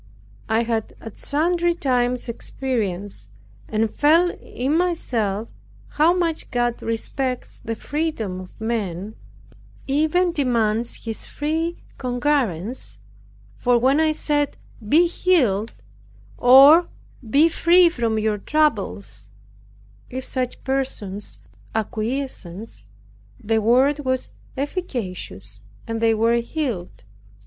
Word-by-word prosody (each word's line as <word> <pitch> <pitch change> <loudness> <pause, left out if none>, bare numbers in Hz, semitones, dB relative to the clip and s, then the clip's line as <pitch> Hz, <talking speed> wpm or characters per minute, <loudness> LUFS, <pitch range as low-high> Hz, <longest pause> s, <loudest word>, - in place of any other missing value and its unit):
I 220 +1 +2
have 225 -2 -2
at 225 - -10
sundry 345 +3 +1
times 250 -5 0
experienced, 205 - -4 0.4
and 220 +1 +1
felt 330 +4 +4
in 265 +5 -2
myself, 230 - 0 0.4
how 310 +3 +3
much 340 -3 -1
God 240 -1 -1
respects 250 +3 -3
the 225 - -3
freedom 260 - -3
of 185 -1 -12
man, 215 -3 -3 0.7
even 315 +6 +2
demands 235 -7 0
his 225 -1 -4
free 320 +3 -2 0.2
concurrence; 245 - -1 0.6
for 245 -1 +3
when 265 +5 +3
I 315 -1 +3
said, 295 -2 -1 0.3
"Be 330 +7 +6
healed," 255 - +2 0.6
or, 275 +7 +8 0.4
"Be 290 +7 +5
free 345 +2 +5
from 235 -9 0
your 215 -1 0
troubles," 110 - -1 0.8
if 260 +1 -5
such 255 -2 -3
persons 235 -7 -3 0.4
acquiesced, 220 - -4 0.5
the 220 +1 0
Word 260 +6 +3
was 260 -2 -2 0.3
efficacious, 190 - -5 0.2
and 225 0 -3
they 225 -1 +4
were 230 +2 +3
healed. 235 - -4
245 Hz, 105 wpm, -22 LUFS, 220-295 Hz, 0.8 s, or